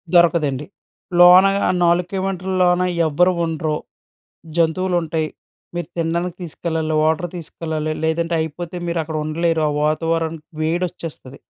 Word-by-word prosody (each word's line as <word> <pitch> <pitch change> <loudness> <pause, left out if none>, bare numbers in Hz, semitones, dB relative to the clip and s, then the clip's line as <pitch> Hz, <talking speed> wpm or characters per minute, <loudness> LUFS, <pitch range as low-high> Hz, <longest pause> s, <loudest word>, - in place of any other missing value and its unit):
దొరకదండి. 155 -5 +3 0.5
లోనగా 185 +3 +7
ఆ - - +4
4 175 +1 +3
కిలోమీటర్ల 190 -1 -2
లోన 180 0 +3 0.2
ఎవ్వరూ 180 +4 +3
ఉండరు. 155 -1 -1 0.8
జంతువులుంటాయి. 165 -2 +1 0.5
మీరు 175 -2 -3
తినడానికి 170 +1 -1
తీసుకెళ్లాలి. 160 -1 -2
వాటర్ 160 +3 +1
తీసుకెళ్ళాలి. 160 -2 -4
లేదంటే 165 +1 0
అయిపోతే 170 +3 -4
మీరు 170 0 -1
అక్కడ 155 0 -4
ఉండలేరు. 165 +1 0
ఆ - - +1
వాతావరన్ 165 +1 0 0.2
వేడొచ్చేస్తది. 165 -5 -3
165 Hz, 115 wpm, -20 LUFS, 160-175 Hz, 0.8 s, లోనగా